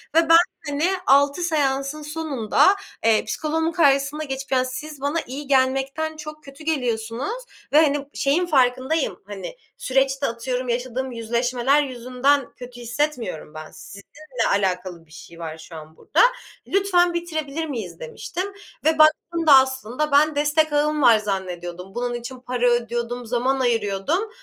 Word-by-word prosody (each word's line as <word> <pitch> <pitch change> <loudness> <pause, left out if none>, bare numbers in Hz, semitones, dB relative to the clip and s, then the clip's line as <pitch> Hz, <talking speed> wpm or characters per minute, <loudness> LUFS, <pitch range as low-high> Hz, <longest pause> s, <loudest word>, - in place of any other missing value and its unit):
ve 330 0 +4
ben 330 - +9 0.3
hani 290 +1 -2 0.2
6 280 +4 +4
seansın 290 -3 0
sonunda, 300 - +2 0.3
eee, 225 -1 +3
psikoloğumun 320 +1 -1
karşısına 285 -2 +2
geçip 270 -1 -6
yani 255 -1 +2
siz 290 +3 -7
bana 290 +4 0
iyi 275 +3 -7
gelmekten 270 +4 +1
çok 305 0 -9
kötü 275 +3 -13
geliyorsunuz 255 - -2 0.3
ve 305 - +7
hani 290 -2 +1
şeyin 295 +6 +1
farkındayım 260 - +1
hani 205 - -7 0.2
süreçte 270 +1 +1
atıyorum 250 +2 -3
yaşadığım 255 +2 -2
yüzleşmeler 245 +4 +1
yüzünden 255 +1 0
kötü 245 -1 -10
hissetmiyorum 240 - -3
ben. 155 0 -9
Sizinle 250 +5 -6
alakalı 185 -3 -1
bir 155 - -26
şey 165 +1 -13
var 160 -1 -6
şu 160 +1 -12
an 155 0 -11
burda. - - +1 0.5
"Lütfen 365 -3 +2
bitirebilir 320 -3 -3
miyiz." 215 - -6
Demiştim 365 - -5 0.3
ve 315 0 +3
baktığımda 315 0 +4
aslında 265 +2 0
ben 300 +2 +4
destek 295 +1 +2
ağım 300 +1 +1
var 235 -4 +7
zannediyordum. 185 -2 -5
Bunun 245 0 -2
için 240 +2 -7
para 245 0 0
ödüyordum, 240 0 -2
zaman 250 +3 0
ayırıyordum 235 - 0
265 Hz, 140 wpm, -22 LUFS, 235-305 Hz, 0.5 s, ben